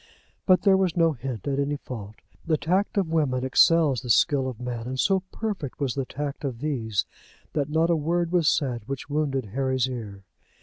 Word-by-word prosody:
But 185 -1 +5
there 195 -2 +5
was 185 -3 0
no 165 -1 +4
hint 125 -5 -6
at 140 -1 0
any 140 +1 0
fault. 110 -6 -8 0.3
The 160 -2 +1
tact 190 +7 0
of 185 -5 +1
women 135 -6 +1
excels 150 0 +4
the 125 - -8
skill 135 +2 +3
of 125 -3 -6
men; 120 -2 -4
and 130 +1 -4
so 195 +4 +3
perfect 200 - -4
was 135 -4 0
the 135 -2 -2
tact 145 +2 -5
of 130 -4 -3
these 120 -8 -1 0.5
women 145 -1 -1
that - - -9
not 165 +1 +3
a - - +4
word 170 +2 0
was 175 -4 +3
said 125 -6 0
which 135 +1 -5
wounded 135 -6 -1
Harry's 130 -1 +1
ear. 105 -6 -7
140 Hz, 205 wpm, -25 LUFS, 125-165 Hz, 0.5 s, But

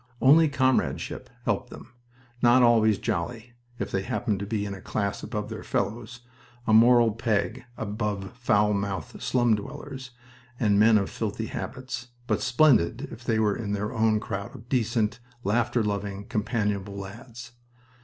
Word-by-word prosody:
Only 155 +4 +6
comradeship 130 -2 0 0.2
helped - - -1
them - - -12 0.5
not 120 +1 +6
always 110 -3 +5
jolly, 115 +7 -3 0.2
if - - -4
they 95 - 0
happened 100 +1 -1
to 100 - -4
be 105 -1 -1
a 100 -2 -6
class 100 -1 -2
above 105 -2 -4
their - - -6
fellows, 120 +2 -3 0.4
a 110 - +2
moral 120 +1 +6
peg 115 +2 -1
above 105 -2 -3
foul 105 -4 +2
mouthed 100 -4 -3
slum 120 -3 +2
dwellers 135 +2 -7 0.5
and 105 -3 +3
men 110 +1 +6
of 100 - -1
filthy 110 0 -3
habits, 130 +1 -6 0.2
but 110 -4 0
splendid 125 - +3
if 120 +1 -10
they 115 -1 +1
were 105 -2 +2
in 105 -3 -3
their 105 +1 -2
own 110 -1 +2
crowd 100 +2 -5
of 120 -1 -13
decent, 115 -3 0 0.2
laughter 120 +3 +1
loving, 100 -1 -3
companionable 105 -2 -2
lads. 115 +4 -9
110 Hz, 150 wpm, -26 LUFS, 100-120 Hz, 0.5 s, Only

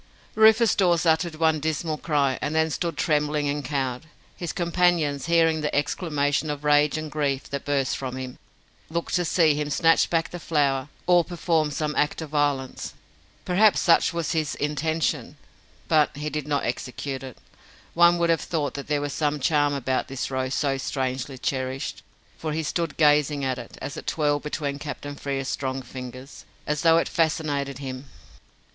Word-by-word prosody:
Rufus 220 +1 +5
Dawes 175 -3 +2
uttered 160 0 +2
one 160 -1 +2
dismal 155 0 -2
cry, 140 -4 +1
and 150 +1 -2
then 160 0 +2
stood 170 +2 -2
trembling 150 -2 +1
and 145 0 -2
cowed. 135 0 -2 0.3
His 175 - -4
companions, 170 -5 +1
hearing 165 -2 +3
the 150 - -2
exclamation 145 0 0
of 145 0 -4
rage 150 +1 +3
and 155 -1 -5
grief 140 -3 -1
that 140 -1 -4
burst 140 -2 0
from 130 -2 -5
him, 130 -1 -7 0.5
looked 170 +1 -3
to 180 - +2
see 160 -2 +3
him 150 0 -2
snatch 165 +3 +3
back 165 -1 0
the 175 - -6
flower 145 -4 0 0.2
or 175 -1 +5
perform 165 -3 0
some 150 +1 -2
act 150 - +1
of 155 - -9
violence. 145 -3 -1 0.5
Perhaps 200 +4 +4
such 170 - +4
was 170 -2 -2
his 155 -3 -1
intention, 155 +2 -1 0.5
but 150 -2 +3
he 150 +1 -3
did 150 0 -3
not 145 -2 0
execute 130 +3 -4
it. 130 -3 -9 0.6
One 170 +1 +5
would 170 -1 +2
have 165 - +1
thought 150 -4 -2
that 140 - -6
there 145 -1 0
was 145 -1 -3
some 150 -1 0
charm 145 0 +2
about 130 -1 -1
this 135 0 -4
rose 130 0 -1
so 135 -2 0
strangely 130 0 -3
cherished, 130 +1 -3 0.4
for 155 -1 -3
he 160 +1 -1
stood 165 +1 -2
gazing 150 -2 +3
at 130 -1 -1
it, 120 - -10
as 145 - -6
it - - -8
twirled 145 -2 +1
between 145 -1 -3
Captain 145 -1 -6
Frere's 135 -1 -3
strong 130 -1 -3
fingers, 130 +2 -9 0.2
as 150 -1 -1
though 165 -1 +5
it 165 - +1
fascinated 150 -4 0
him. 130 -1 -6
150 Hz, 175 wpm, -25 LUFS, 140-160 Hz, 0.6 s, Rufus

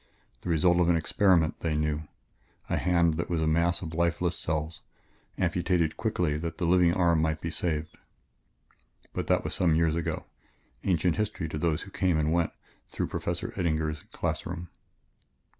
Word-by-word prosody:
The - - -5
result 85 +2 +3
of 85 -1 +3
an 85 - +4
experiment, 85 0 +2
they 80 -2 -1
knew 75 0 -1 0.6
a - - +2
hand 85 -3 +2
that 85 - -2
was 85 -2 0
a 80 - +1
mass 85 +3 +2
of 80 -2 -5
lifeless 85 +1 +1
cells, 75 0 -3 0.6
amputated 85 -2 +1
quickly 90 -9 0
that 85 +1 -4
the 85 - -1
living 90 0 +5
arm 85 -2 +3
might 80 -1 0
be 85 - -4
saved 80 -1 -2 1.2
but - - -3
that - - +2
was - - -3
some 90 - 0
several 80 -2 +4
years 80 -1 +2
ago, 85 - -2 0.6
ancient 90 -2 +1
history 105 -6 -2
to 75 - -4
those 80 -1 0
who 95 - -12
came 90 -4 +1
and 80 +1 +1
went 85 -1 +1 0.4
through - - -3
Professor - - -3
Eddinger's 80 -3 -1
class - - -2
room. 90 0 -6
85 Hz, 175 wpm, -28 LUFS, 80-90 Hz, 1.2 s, living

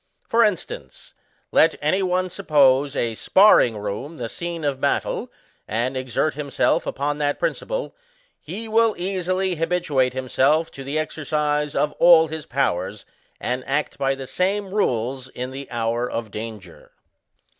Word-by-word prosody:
For 230 +1 +3
instance, 210 -5 -3 0.4
let - - +4
any 155 +7 +1
one 185 0 +1
suppose 140 -2 +3
a 115 -3 0
SPARRING 125 - +5
ROOM 105 +10 -5
the 115 -4 -4
sccue 170 0 -4
of 135 -2 -2
battle, - - -1 0.4
and 120 +5 -1
exert 130 +4 -1
him 145 0 -6
self - - +1
upon 145 +1 -2
that 145 -1 0
principle, - - -3 0.4
he 225 +2 -7
will 225 0 +3
easily 185 0 -1
habituate 160 -6 +1
him 130 0 -4
self 150 +6 +2
to 135 - -9
the 140 +3 -3
exercise 150 -1 -1
of 150 - +1
all 165 -2 +7
his 160 -1 -6
powers, 105 -6 -1 0.3
and 125 +1 -2
act 145 +2 -1
by 135 0 +1
the 135 0 -7
same 190 +6 -1
rules 130 - -1
in 125 0 -6
the 135 +1 -8
hour 120 +1 -1
of 115 -2 -4
danger. 105 -5 -9
145 Hz, 150 wpm, -23 LUFS, 125-175 Hz, 0.4 s, all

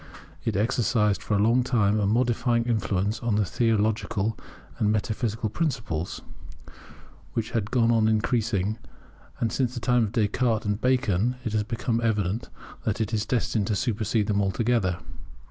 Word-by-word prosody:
It - - -1
exercised 105 -1 +1
for 105 - -1
a - - +2
long 120 +3 +4
time 110 -4 +2
a 100 - +1
modifying 120 +1 +2
influence 105 -2 0
upon 115 -4 0
theological 110 -1 0 0.4
and 105 -1 +2
metaphysical 110 +1 -1
principles, 110 - -3 1.1
which 110 -1 -2
has 110 -3 0
gone 115 +1 +2
on 110 -2 +3
increasing; 110 -2 0 0.6
and 115 - 0
since 125 -1 -1
the - - -3
time 120 -1 +2
of 100 - -5
Descartes 110 +1 +1
and 105 +1 -1
Bacon 125 -3 +2
it 110 - -2
has 110 - +2
become 115 +1 -1
evident 105 -1 0 0.3
that 110 -1 -1
it 110 0 -1
is 105 0 0
destined 115 -4 0
to 105 - 0
supersede 110 0 0
them 100 0 +1
altogether. 100 -2 +1
110 Hz, 150 wpm, -26 LUFS, 105-120 Hz, 1.1 s, long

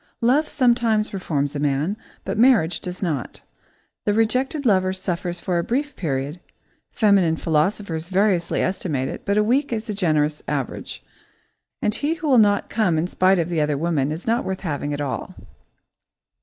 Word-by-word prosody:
Love 275 +6 +3
sometimes 235 -5 +2
reforms 150 -7 -2
a - - -2
man, 145 +6 0 0.3
but - - -2
marriage 220 -9 +4
does 180 +2 -6
not. 150 -9 -3 0.6
The 205 - +2
rejected 255 +6 +1
lover 185 -4 +3
suffers 180 -2 -3
for 175 0 -1
a - - -1
brief 285 - -2
period, 145 0 -3 0.5
feminine 200 -7 +3
philosophers 165 +1 -1
variously 190 -2 +1
estimate 150 -8 -1
it, - - -7
but 200 +1 +2
a 210 - +4
week 265 +6 +1
is 225 0 -3
a - - -1
generous 155 -6 +1
average, - - -4 0.8
and 210 - +2
he 295 +7 0
who 330 -2 -5
will 260 -4 +5
not 205 -2 +3
come 200 -7 +1
in 160 - +1
spite 185 +1 +3
of 170 -1 0
"the 165 -3 0
other 150 -1 0
woman" 150 -3 0
is 160 +3 -6
not 230 +2 +1
worth 190 0 -4
having 145 -4 -3
at 145 0 -3
all. 140 -3 -4
185 Hz, 170 wpm, -22 LUFS, 160-220 Hz, 0.8 s, will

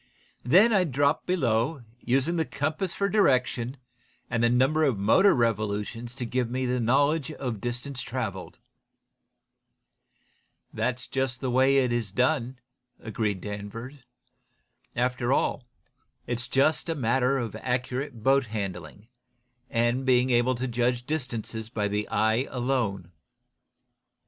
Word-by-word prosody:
"Then 190 - +5
I'd 180 -7 +2
drop 145 +3 +1
below, 130 -4 0 0.2
using 135 +8 +1
the 165 - +1
compass 155 +5 -2
for 200 - 0
direction, 130 - +1 0.5
and 115 -1 0
the 120 - +4
number 135 +6 +3
of 135 -8 +2
motor 110 - +4
revolutions 115 0 -1
to 125 - -4
give 125 0 -1
me 130 +1 -2
the 125 0 0
knowledge 140 +6 +2
of 120 -8 -4
distance 125 +2 -4
traveled." 110 -7 -5 2.2
"That's 125 0 -2
just 130 -1 -2
the 130 -2 -2
way 130 +2 +4
it 130 -3 +2
is 120 -4 -1
done," 125 +1 0 0.4
agreed 105 -3 -2
Danvers. 105 +7 -7 1.0
"After 125 0 0
all, 135 -2 0 0.6
it's 120 0 -3
just 145 +5 +2
a 165 - 0
matter 130 +1 +1
of 115 -5 -4
accurate 125 0 -3
boat 135 0 +3
handling, 100 -2 -6 0.6
and 120 +2 +1
being 130 0 +3
able 120 +1 +3
to 130 +2 -3
judge 120 0 0
distances 115 -6 -4
by 105 -2 -1
the 105 +1 -2
eye 110 +5 +1
alone. 120 -9 -2
125 Hz, 130 wpm, -27 LUFS, 115-135 Hz, 2.2 s, Then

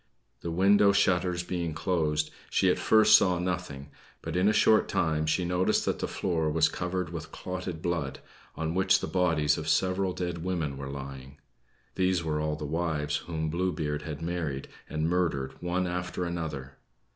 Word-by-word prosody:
The 85 - -5
window 100 +4 +5
shutters 90 -3 +2
being 85 -3 -3
closed, 80 -4 0 0.2
she - - +3
at - - -1
first 110 0 +6
saw 90 -2 +4
nothing; 90 -6 -4 0.3
but - - -4
in 90 +3 +3
a - - +5
short 110 0 +4
time 80 -2 0
she 90 +3 +1
noticed 90 +1 +1
that - - -1
the - - -1
floor 80 -4 -1
was 80 +1 +3
covered 90 -1 -3
with 80 -2 -7
clotted 90 -3 -5
blood, 80 -6 -2 0.4
on 80 0 -2
which 95 0 +3
the - - -3
bodies 80 -5 +2
of 80 0 -4
several 95 +4 +1
dead 90 -2 -4
women 85 -6 -2
were 70 0 -6
lying. 70 0 -8 0.6
(These 95 -2 +1
were 75 -1 -1
all 75 0 -1
the 75 0 -6
wives 75 -2 -1
whom 80 -2 -3
Blue 90 +3 0
Beard 75 -3 -2
had 75 0 -6
married, 80 -6 -3 0.2
and 80 +1 -1
murdered 85 -6 0
one 90 +1 0
after 90 0 -3
another!) 75 -6 -5
85 Hz, 175 wpm, -28 LUFS, 75-90 Hz, 0.6 s, first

